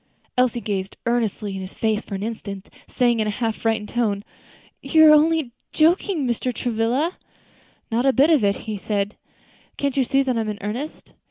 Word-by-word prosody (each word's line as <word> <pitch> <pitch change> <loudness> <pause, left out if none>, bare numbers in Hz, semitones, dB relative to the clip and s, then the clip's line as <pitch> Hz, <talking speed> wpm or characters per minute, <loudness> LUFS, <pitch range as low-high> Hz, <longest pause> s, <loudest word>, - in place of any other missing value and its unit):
Elsie 250 -1 +2
gazed 195 -3 -3
earnestly 225 -4 -1
in 190 - -5
his 185 0 -9
face 220 -1 0
for 200 - -6
an 195 - -4
instant, 200 -3 -6 0.2
saying 240 -2 +1
in 215 - +1
a - - +1
half 225 +1 -1
frightened 220 -2 -1
tone, 210 -5 0 0.6
"You 315 -1 +5
are 305 - +9
only 310 -3 +3 0.2
joking, 330 0 +2
Mr. 245 +1 -1
Travilla." 245 +8 -1 0.7
"Not 240 +4 +1
a - - +6
bit 280 +5 +4
of 295 -8 +4
it," 200 0 +3 0.3
said 205 -1 -1
he; - - -36 0.6
"can't 280 -2 -1
you 270 - +4
see 275 +2 +2
that 255 -3 0
I'm 220 -1 -2
in 210 - -4
earnest?" 240 +10 -6
235 Hz, 185 wpm, -22 LUFS, 210-275 Hz, 0.7 s, are